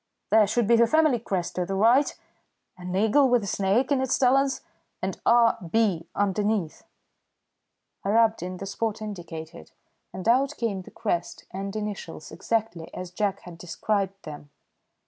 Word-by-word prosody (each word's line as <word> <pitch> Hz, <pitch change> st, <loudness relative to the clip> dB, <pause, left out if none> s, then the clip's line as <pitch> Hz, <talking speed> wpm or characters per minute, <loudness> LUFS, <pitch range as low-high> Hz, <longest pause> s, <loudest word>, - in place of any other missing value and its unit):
There 215 Hz, -1 st, +6 dB
should 235 Hz, +3 st, +1 dB
be 235 Hz, +2 st, +4 dB
the 235 Hz, 0 st, +5 dB
family 310 Hz, -2 st, +3 dB
crest 190 Hz, -6 st, -3 dB
to 180 Hz, -, 0 dB
the 195 Hz, -, -2 dB
right 235 Hz, +8 st, +3 dB, 0.6 s
an 180 Hz, 0 st, -6 dB
eagle 220 Hz, +7 st, +4 dB
with 245 Hz, -3 st, +3 dB
a -, -, -4 dB
snake 200 Hz, +8 st, +1 dB
in 275 Hz, -2 st, +3 dB
its 265 Hz, -, +1 dB
talons 270 Hz, +1 st, +2 dB, 0.4 s
and -, -, -4 dB
R. 235 Hz, -1 st, +5 dB
B. 195 Hz, -5 st, +1 dB
underneath." 205 Hz, -3 st, -1 dB, 1.2 s
I 195 Hz, -, -2 dB
rubbed 225 Hz, -1 st, +3 dB
in 180 Hz, +1 st, -5 dB
the 195 Hz, -, -6 dB
spot 215 Hz, +2 st, -3 dB
indicated, 170 Hz, -, -8 dB, 0.4 s
and 185 Hz, -, -6 dB
out 270 Hz, +5 st, +3 dB
came 205 Hz, -5 st, -2 dB
the -, -, -13 dB
crest 175 Hz, -6 st, -3 dB
and 195 Hz, +2 st, -5 dB
initials 205 Hz, -7 st, -6 dB
exactly 175 Hz, -1 st, -2 dB
as 180 Hz, -1 st, -6 dB
Jack 200 Hz, +1 st, -1 dB
had 170 Hz, -2 st, -12 dB
described 195 Hz, +2 st, -2 dB
them. 145 Hz, -1 st, -9 dB
205 Hz, 160 wpm, -26 LUFS, 185-230 Hz, 1.2 s, There